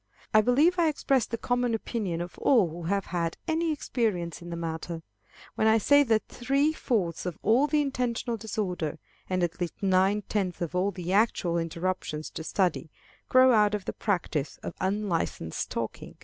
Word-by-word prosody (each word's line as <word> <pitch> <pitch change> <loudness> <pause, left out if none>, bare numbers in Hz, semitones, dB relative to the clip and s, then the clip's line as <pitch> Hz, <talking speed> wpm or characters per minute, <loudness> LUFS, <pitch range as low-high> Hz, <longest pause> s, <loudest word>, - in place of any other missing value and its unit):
I 215 - +7
believe 295 - +3
I 335 - +4
express 270 -5 +1
the 230 - -3
common 245 0 0
opinion 205 -7 -3
of 175 0 -6
all 230 -9 +4
who 170 +1 -7
have 200 +3 0
had 170 -1 -1
any 325 0 +1
experience 210 - -2
in 175 - -9
the 170 - -4
matter, 165 0 -4 0.5
when 220 - +1
I 220 0 +6
say 285 +7 +5
that 225 -6 +1
three 275 +5 +1
fourths 190 - -1
of 175 - -4
all 250 +7 +4
the 300 0 +2
intentional 250 -3 -1
disorder, 195 -7 -3 0.3
and 185 -1 0
at 175 +1 -2
least 175 - -2
nine 195 +2 +2
tenths 190 -4 -2
of 170 -1 -3
all 180 +2 +1
the 180 -1 -4
actual 190 -5 +2
interruptions 165 -2 -3
to 160 - -6
study, 180 -2 0 0.4
grow 255 0 +6
out 210 -1 +4
of 205 - -5
the - - -3
practice 165 -7 -2
of - - -5
unlicensed 190 - -1
talking. - - -5
200 Hz, 175 wpm, -28 LUFS, 175-245 Hz, 0.5 s, I